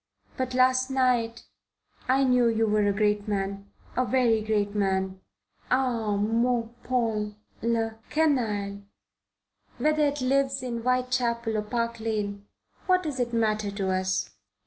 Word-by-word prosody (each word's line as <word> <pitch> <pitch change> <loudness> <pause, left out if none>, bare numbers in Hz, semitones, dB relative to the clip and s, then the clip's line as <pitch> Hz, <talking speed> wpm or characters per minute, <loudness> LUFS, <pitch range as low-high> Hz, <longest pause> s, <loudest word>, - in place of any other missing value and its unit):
But 255 -1 -3
last 255 +1 +3
night 250 -3 +1 0.6
I 265 +2 +3
knew 250 -2 +4
you 225 -1 +2
were 210 -1 +2
a - - +3
great 210 0 +1
man 200 -1 -3 0.3
a 255 - +2
very 235 -2 +2
great 210 -1 0
man. 190 -2 -1 0.5
Ah, 240 -5 +1
mon 230 +2 +1
Paul. 220 -4 -1 0.3
La 225 -1 0 0.2
canaille, 215 -10 0 1.0
whether 305 0 +2
it 285 +1 -2
lives 270 0 +1
in 240 -2 -3
Whitechapel 245 -2 0
or 215 - +1
Park 230 +2 -2
Lane, 205 -2 -3 0.4
what 365 0 +3
does 295 -5 -4
it 240 -1 0
matter 215 -3 +1
to 200 -1 -2
us?" 185 0 -1
230 Hz, 135 wpm, -27 LUFS, 210-255 Hz, 1.0 s, knew